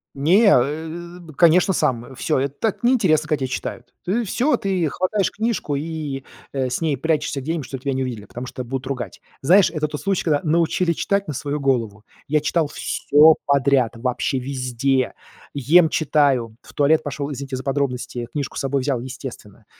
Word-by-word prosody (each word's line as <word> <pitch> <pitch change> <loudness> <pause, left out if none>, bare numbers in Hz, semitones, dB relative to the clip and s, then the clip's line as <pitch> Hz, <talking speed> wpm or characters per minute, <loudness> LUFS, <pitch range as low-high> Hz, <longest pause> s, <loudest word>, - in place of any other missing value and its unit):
Не, 175 +11 +4
э, 160 +6 -2
б 160 -3 -13
конечно, 175 +4 +5
сам. 125 -4 -1
Всё, 150 +1 0
это 140 +1 -1
так 225 +2 -2
неинтересно, 185 - +3
когда 145 -4 0
те 125 - -7
читают. - - -5
Ты 215 +7 0
всё 250 +8 +1
ты 185 -5 0
хватаешь 185 +6 0
книжку 215 -9 -2
и, 150 -2 -4 0.3
э, 130 -2 -1
с 125 - -2
ней 155 -4 0
прячешься 150 0 -1
где-нибудь, 155 0 -3
чтоб 135 0 -7
тебя 140 - -1
не 130 - -1
увидели, 120 -5 -5
потому 125 +5 -7
что 125 - -6
будут 130 +2 -5
ругать. 130 -3 -5 0.2
Знаешь, 185 +7 +5
это 155 -2 -2
тот 150 - -5
случай, 195 -2 -1
когда 150 -3 +2
научили 170 +2 +2
читать 200 +4 -1
на 150 - -3
свою 145 +3 -3
голову. 115 -6 -1 0.2
Я 150 +1 +3
читал 155 +1 0
всё 155 +2 +4
подряд, 135 -4 +2
вообще 125 +2 -1
везде. 130 0 -1 0.4
Ем- 155 +4 +4
читаю, 140 -8 +1
в - - -16
туалет 150 +2 +3
пошел, 145 0 -4
извините 135 -1 -5
за 130 - -7
подробности, 125 -3 -2
книжку 140 -3 -4
с - - -2
собой 135 0 0
взял, 130 -3 -1
естественно. 120 -5 -9
145 Hz, 180 wpm, -21 LUFS, 130-165 Hz, 0.4 s, конечно